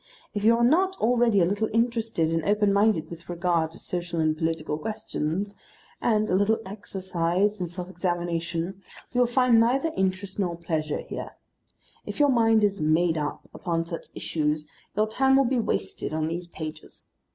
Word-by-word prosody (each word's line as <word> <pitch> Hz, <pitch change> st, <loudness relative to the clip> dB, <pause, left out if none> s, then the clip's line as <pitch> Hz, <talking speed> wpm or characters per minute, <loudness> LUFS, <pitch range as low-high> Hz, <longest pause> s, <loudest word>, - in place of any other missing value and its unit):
If 205 Hz, -, -3 dB
you 230 Hz, +2 st, +6 dB
are 235 Hz, -, +2 dB
not 370 Hz, +9 st, +3 dB
already 235 Hz, -3 st, +3 dB
a -, -, +5 dB
little 205 Hz, +4 st, 0 dB
interested 225 Hz, -7 st, +1 dB
and 165 Hz, -1 st, 0 dB
open 205 Hz, +1 st, +2 dB
minded 200 Hz, -5 st, +2 dB
with 170 Hz, 0 st, -10 dB
regard 170 Hz, -2 st, +1 dB
to -, -, -11 dB
social 175 Hz, -1 st, -4 dB
and 155 Hz, -1 st, +2 dB
political 160 Hz, -1 st, -2 dB
questions, 205 Hz, -3 st, -3 dB, 0.5 s
and 215 Hz, -2 st, +2 dB
a -, -, -1 dB
little 205 Hz, +3 st, +3 dB
exercised 190 Hz, 0 st, -1 dB
in 180 Hz, -, -1 dB
self 175 Hz, +1 st, -6 dB
examination, 175 Hz, 0 st, -2 dB, 0.3 s
you 245 Hz, -, 0 dB
will 245 Hz, -, +4 dB
find 245 Hz, -1 st, +4 dB
neither 265 Hz, +8 st, +2 dB
interest 190 Hz, +1 st, -1 dB
nor 180 Hz, -4 st, 0 dB
pleasure 155 Hz, -3 st, -2 dB
here. -, -, -7 dB, 0.7 s
If -, -, -7 dB
your 290 Hz, -1 st, +5 dB
mind 225 Hz, -3 st, +4 dB
is 200 Hz, -3 st, +1 dB
"made 160 Hz, +2 st, +3 dB
up" 150 Hz, -2 st, -3 dB
upon 165 Hz, -2 st, -2 dB
such 165 Hz, 0 st, -6 dB
issues 150 Hz, -1 st, -1 dB, 0.3 s
your 215 Hz, -, +4 dB
time 265 Hz, +4 st, +3 dB
will 270 Hz, 0 st, +5 dB
be 250 Hz, 0 st, +1 dB
wasted 215 Hz, -, -2 dB
on 155 Hz, 0 st, 0 dB
these 170 Hz, +2 st, -4 dB
pages. 155 Hz, -2 st, -8 dB
190 Hz, 175 wpm, -26 LUFS, 165-220 Hz, 0.7 s, you